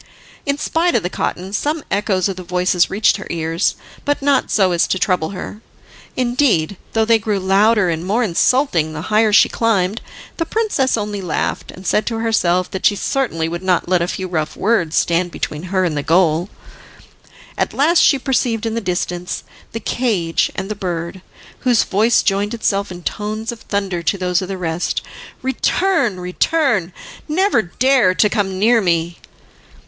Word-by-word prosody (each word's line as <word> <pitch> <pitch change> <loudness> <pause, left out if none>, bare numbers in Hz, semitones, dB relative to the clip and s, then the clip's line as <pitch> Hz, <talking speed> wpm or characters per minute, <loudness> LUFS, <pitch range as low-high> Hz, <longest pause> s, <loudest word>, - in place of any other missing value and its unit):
In 280 0 +1
spite 335 +3 0
of 220 - +2
the 180 - -3
cotton, 185 +2 -3
some 295 +7 -1
echoes 195 -2 +1
of 195 - -3
the 185 - -7
voices 180 0 +1
reached 205 +3 +2
her 195 - -8
ears, 165 +2 -1 0.3
but 290 0 0
not 280 -1 +1
so 190 -3 +3
as 170 -1 +2
to - - 0
trouble 180 -4 0
her. 200 +2 -7 0.6
Indeed, 240 - +1 0.2
though 225 0 +2
they 225 0 +4
grew 210 -2 -1
louder 200 +2 +3
and 165 -1 -2
more 210 +7 +1
insulting 175 - +1
the 160 +5 -6
higher 215 0 +4
she 205 - +6
climbed, 215 -2 0 0.4
the 330 - -1
princess 410 - 0
only 205 -1 -3
laughed, 175 -4 -2
and 185 - -11
said 210 - +1
to 230 - -1
herself 185 -6 +1
that 190 - -5
she 205 - +1
certainly 200 -9 -1
would 170 +1 -4
not 185 -2 +1
let 180 -1 +2
a 170 - 0
few 185 0 -4
rough 155 -4 -3
words 190 -7 +1
stand 175 +1 +1
between 150 -3 -4
her 185 -1 +1
and 165 -4 -1
the 145 - -1
goal. 170 +2 +2 1.1
At - - -1
last 320 +5 +3
she 280 - +5
perceived 245 -4 0
in 225 - -1
the 230 - -2
distance 180 -1 -3 0.3
the 225 - -4
cage 205 -8 0
and 190 - -4
the 215 - -3
bird, 180 -2 -4 0.4
whose 245 -3 +3
voice 215 +4 +2
joined 205 +2 0
itself 200 -3 -1
in 175 -1 -9
tones 215 +3 -3
of 235 - -10
thunder 195 -4 -2
to 170 +4 0
those 180 -1 0
of 185 - -4
the 195 0 -4
rest: 170 -1 -2 0.4
"Return, 265 - +1
return! 190 - 0 0.4
never 365 - +2
dare 240 0 +2
to 210 - +3
come 195 -3 -1
near 225 +4 +4
me." 170 -2 0
195 Hz, 180 wpm, -18 LUFS, 180-230 Hz, 1.1 s, she